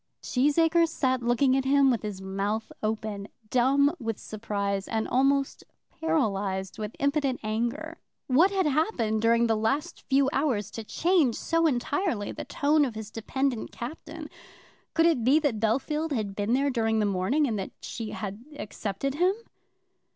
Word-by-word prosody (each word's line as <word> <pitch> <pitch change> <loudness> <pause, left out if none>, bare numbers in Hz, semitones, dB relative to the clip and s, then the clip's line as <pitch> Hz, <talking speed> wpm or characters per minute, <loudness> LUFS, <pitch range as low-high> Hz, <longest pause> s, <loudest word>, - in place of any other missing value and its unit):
Cheesacre 325 +5 +3
sat 260 -5 0
looking 245 +3 +3
at 270 - +1
him 275 0 +4
with 235 - 0
his 205 -3 -5
mouth 200 +3 -2
open, 215 -2 -3 0.2
dumb 275 +4 +4
with 225 -4 -3
surprise, 200 -2 -3
and 220 -1 -1
almost 275 +2 +1 0.4
paralysed 200 - -1
with 210 0 -5
impotent 280 -2 0
anger. 240 +10 -2 0.3
What 310 +9 +4
had 385 -2 0
happened 265 - +1
during 230 +1 +4
the 225 -1 +2
last 275 +10 -1
few 275 0 +4
hours 260 -8 0
to 225 - -6
change 315 - +2
so 330 0 +1
entirely 250 - -1
the - - -6
tone 295 +1 +2
of 250 -5 -2
his 215 -1 -7
dependent 260 +2 -2
captain? 310 +5 -7 0.7
Could 330 - +4
it 320 -9 +3
be 265 +6 +5
that 290 -9 0
Bellfield 290 +8 0
had 210 -5 -2
been 205 +3 0
there 275 +2 +2
during 225 -3 +1
the 215 - +2
morning, 200 +10 +1
and 220 -4 -2
that 190 - -4
she 225 -2 -6
had 205 +1 -6
accepted 215 +4 -3
him? 360 +6 +2
250 Hz, 160 wpm, -27 LUFS, 215-295 Hz, 0.7 s, be